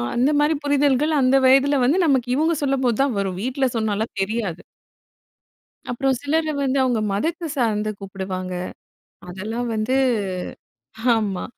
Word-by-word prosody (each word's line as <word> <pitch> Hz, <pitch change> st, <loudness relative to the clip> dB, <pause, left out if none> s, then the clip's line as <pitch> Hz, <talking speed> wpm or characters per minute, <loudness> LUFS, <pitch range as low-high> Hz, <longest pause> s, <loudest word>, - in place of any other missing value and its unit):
அந்த 250 Hz, +4 st, +3 dB
மாரி 300 Hz, +2 st, +3 dB
புரிதல்கள் 285 Hz, +1 st, +2 dB
அந்த 255 Hz, +1 st, +3 dB
வயதுல 275 Hz, +2 st, +4 dB
வந்து, 285 Hz, +8 st, +3 dB
நமக்கு 260 Hz, -5 st, +1 dB
இவுங்க 320 Hz, +4 st, +2 dB
சொல்லும்போதான் 265 Hz, -2 st, +1 dB
வரும், 190 Hz, -2 st, -2 dB
வீட்ல 260 Hz, +2 st, 0 dB
சொன்னால்லாம் 220 Hz, -1 st, -2 dB
தெரியாது. 195 Hz, -4 st, -2 dB, 1.3 s
அப்புறம் 265 Hz, +1 st, 0 dB
சிலர 315 Hz, +3 st, 0 dB, 0.2 s
வந்து 270 Hz, 0 st, 0 dB
அவுங்க 245 Hz, -3 st, +1 dB
மதத்த 330 Hz, -, -2 dB
சார்ந்து 215 Hz, -4 st, 0 dB
கூப்புடுவாங்க. 190 Hz, -2 st, -5 dB, 0.8 s
அதெல்லாம் 220 Hz, +7 st, -4 dB
வந்து 220 Hz, +4 st, 0 dB, 1.2 s
ஆமா 205 Hz, -4 st, -2 dB
250 Hz, 120 wpm, -22 LUFS, 210-280 Hz, 1.3 s, வயதுல